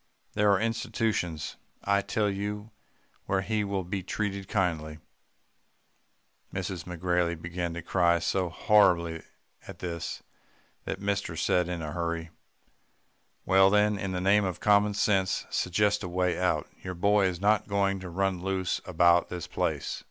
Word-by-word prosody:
There 105 0 +3
are 100 - +3
institutions, 110 - -2 0.3
I 100 0 +2
tell 105 +1 0
you, 105 +2 -4 0.6
where 95 -1 +1
he 105 +2 -1
will 100 -1 -2
be 95 +2 -3
treated 100 0 -3
kindly.' 80 -7 -1 1.5
"Mrs. 95 -2 -4
McGrailey 90 -1 -1
began 85 0 -4
to 85 - -6
cry 85 -1 +3
so 90 +2 0
horribly 85 -4 +3 0.5
at - - -9
this, 85 -2 -5 0.6
that - - -4
mister 100 -3 -2
said 90 +2 +1
in 85 -2 -3
a 75 - -4
hurry, 85 -1 -3 1.1
'Well, 95 0 +6
then, 105 0 +3
in 95 -1 -3
the 90 - -2
name 100 +2 +4
of 95 -3 -3
common 105 0 +3
sense, 100 -1 +1
suggest 105 +3 +1
a 90 - -5
way 90 0 0
out. - - +1
Your 90 0 -5
boy 100 +2 +3
is 90 -2 -3
not 105 +2 +2
going 100 -1 +1
to 90 -1 -7
run 95 0 -1
loose 95 -1 -1
about 85 -1 +4
this 90 -2 -5
place. - - -2
95 Hz, 150 wpm, -28 LUFS, 85-100 Hz, 1.5 s, Well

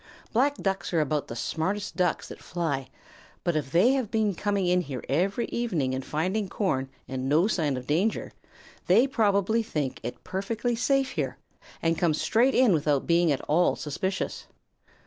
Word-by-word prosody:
Black 275 +5 +3
Ducks 195 -6 -2
are - - +4
about 150 -1 0
the 115 - -6
smartest 185 - -2
Ducks 180 -1 0
that - - -10
fly, 150 -6 -3 0.5
but 175 -2 0
if 145 -3 -2
they 185 - +5
have 260 -6 0
been 215 -2 +1
coming 200 +1 0
in 180 0 +3
here 135 -7 -6
every 190 - +1
evening 170 - -1
and 130 0 -3
finding 185 +9 -1
corn 135 -11 -1 0.2
and 130 0 -3
no 155 +5 +4
sign 155 -10 0
of 125 - -6
danger, 175 - 0 0.6
they 215 +8 +6
probably 220 -3 +2
think 150 - -3
it 120 - -6
perfectly 215 +6 -2
safe 270 +3 +1
here - - -3 0.5
and 165 0 +1
come 165 -3 +2
straight 225 - +2
in 250 -6 +5
without 150 -3 +1
being 170 -1 +3
at 140 - 0
all 170 +4 +2
suspicious. 185 +6 -3
180 Hz, 170 wpm, -27 LUFS, 150-215 Hz, 0.6 s, they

